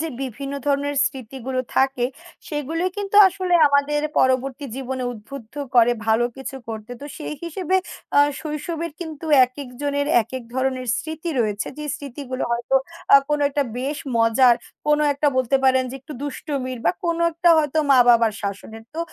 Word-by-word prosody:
যে 325 - -2
বিভিন্ন 270 +2 -5
ধরনের 285 0 0
স্মৃতিগুলো 260 0 -4 0.2
থাকে, 265 -2 +2 0.4
সেগুলোই 325 +5 -2
কিন্তু 405 0 -2
আসলে 370 -1 -1
আমাদের 285 +1 +2 0.2
পরবর্তী 260 +2 +1
জীবনে 260 -1 -4
উদ্বুদ্ধ 230 +2 -11 0.2
করে 240 0 +6
ভালো 225 +2 +3
কিছু 270 0 -6
করতে। 220 +1 -7
তো - - -8
সেই 300 -1 -5
হিসেবে 360 +2 -1 0.4
আ - - +7 0.2
শৈশবের 320 +2 -4
কিন্তু 320 -2 -7 0.2
একেকজনের 285 +2 -4 0.2
একেক 245 +3 -7
ধরনের 260 -1 -1
স্মৃতি 320 +1 -5
রয়েছে। 210 -2 -1
যে 300 - -5
স্মৃতিগুলো 270 -2 -5
হয়তো 240 +2 -1 0.4
আ - - +12
কোনো 295 -1 +1
একটা 285 0 0 0.2
বেশ 280 +4 -3 0.2
মজার, 230 +2 +5 0.3
কোনো 300 0 +3
একটা 285 +1 +1
বলতে 260 +1 +2
পারেন 260 0 +4
যে - - -7
একটু 275 - -10
দুষ্টুমির 270 -2 -4
বা - - +6
কোনো 335 0 0
একটা 340 +2 +2
হয়তো 305 0 0
মা 270 - +7
বাবার 230 -2 +5
শাসনের। 205 +2 -6
তো - - -6
275 Hz, 155 wpm, -22 LUFS, 250-300 Hz, 0.4 s, আ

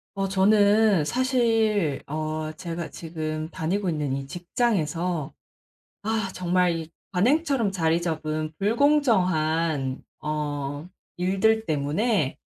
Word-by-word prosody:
어 195 0 -1
저는 205 -1 +4
사실 225 - +1
어 155 +1 -3
제가 170 +1 -5
지금 155 -1 -5
다니고 185 +5 -2
있는 150 -4 -1
이 135 0 -4
직장에서 175 - -1 0.7
아 220 -1 -1
정말 180 0 +2
이 160 0 -7 0.2
관행처럼 250 - +2
자리 165 -2 +1
잡은 155 -2 -2
불공정한 180 - +2 0.2
어 145 0 -3 0.3
일들 195 +5 +2
때문에 155 - 0
175 Hz, 200 characters per minute, -25 LUFS, 155-210 Hz, 0.7 s, 저는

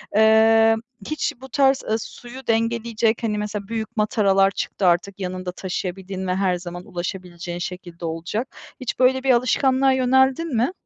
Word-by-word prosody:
Emm, 225 +1 +5 0.3
hiç 310 - -1
bu 265 - -10
tarz, 270 0 +3
ııı, 220 - 0
suyu 245 +3 -10
dengeleyecek, 230 0 0
hani, 210 -2 0
mesela 210 -1 -4
büyük 225 0 -5
mataralar 195 -2 +3
çıktı 190 -1 -2
artık, 185 +3 +1
yanında 185 -1 -4
taşıyabildiğin 190 +1 -5
ve 180 - 0
her 190 -1 +1
zaman 175 0 -7
ulaşabileceğin 175 -1 -6
şekilde 175 -1 -6
olacak. 170 +9 -3 0.3
Hiç 255 -1 -4
böyle 260 +1 +3
bir 270 - 0
alışkanlığa 260 +2 +3
yöneldin 265 +3 +2
mi? 240 +8 +2
215 Hz, 150 wpm, -22 LUFS, 185-245 Hz, 0.3 s, Emm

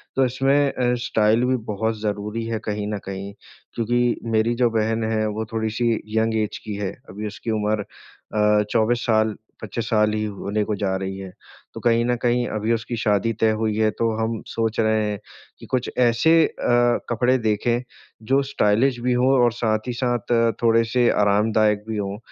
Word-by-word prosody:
तो 135 - +3
इसमें 135 +3 +2
अ, 125 -1 +1
स्टाइल 110 +2 +2
भी 130 +1 +2 0.2
बहुत 110 +1 -2
ज़रूरी 105 +2 -3
है 115 -1 -2
कहीं 105 0 -2
न - - -1
कहीं 100 +1 -6 0.4
क्योंकि 120 +1 +1 0.2
मेरी 115 +2 +2
जो 120 - +4
बहन 110 0 0
है 110 -1 0
वो 110 +1 -3
थोड़ी-सी 110 +1 0 0.3
यंग 110 0 +1
ऐज़ 105 - -5
की 105 - -4
है। 100 -2 -3 0.2
अभी 105 +3 -5
उसकी 105 +2 -5
उम्र 105 -1 0
अ, 105 +1 -1
24 120 +1 +1
साल 110 -1 +2 0.3
25 110 +2 -4
साल 105 -1 +2
ही 110 0 -1
होने 105 +1 -2
को 105 - -2
जा 95 -1 -1
रही 95 0 -4
है। 95 -1 -8 0.4
तो - - -7
कहीं 115 0 +2
न 125 0 +1
कहीं 120 0 +1
अभी 110 +2 0
उसकी 115 +1 -3
शादी 110 +1 +1
तय 110 -1 +4
हुई 110 -1 0
है 110 0 +3
तो 115 - +2
हम 110 0 -2
सोच 115 -1 -2
रहे 110 -1 +2
हैं 105 -1 -3 0.4
कि - - -11
कुछ 130 -1 0
ऐसे 140 +7 +4
अ, 120 0 +1
कपड़े 125 +2 +2
देखें 115 +2 0 0.5
जो 135 - +5
स्टाइलिश 120 0 +1
भी 125 +1 +1
हों 125 +2 +3
और 120 - +4
साथ 110 -1 -1
ही 125 - -2
साथ 120 0 -2
अ, 115 -1 +3
थोड़े 115 0 +4
से 120 +1 +2
आरामदायक 105 +1 +2
भी 110 - -2
हों 100 -1 -3
110 Hz, 190 wpm, -22 LUFS, 105-120 Hz, 0.5 s, जो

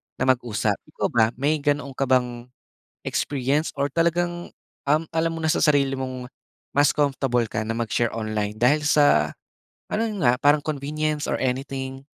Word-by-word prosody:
na - - -2
mag-usap. 120 -4 -1 0.2
Ikaw - - 0
ba, 115 -2 +4
may 145 +4 0
ganoon 145 -1 -1
ka 135 +1 -2
bang 125 -2 0 0.6
experience 145 +3 -1
or 140 0 -1
talagang, 175 +3 -1 0.3
um, 150 +3 +2
alam 165 0 +1
mo 165 - -5
na 160 - 0
sa 155 - +2
sarili 140 -3 +3
mong, 130 -1 -5 0.5
mas 145 0 +5
comfortable 135 -4 +1
ka 110 +1 -3
na 115 - -2
mag-share 115 0 -1
online 110 -1 -2
dahil 145 +5 +4
sa 145 - +4 0.6
ano 215 - +1
'yun 200 -9 -2
nga 125 +1 +3
parang 145 +1 +5
convenience 150 +1 -2
or - - 0
anything? 135 +1 -3
135 Hz, 165 wpm, -24 LUFS, 125-150 Hz, 0.6 s, mas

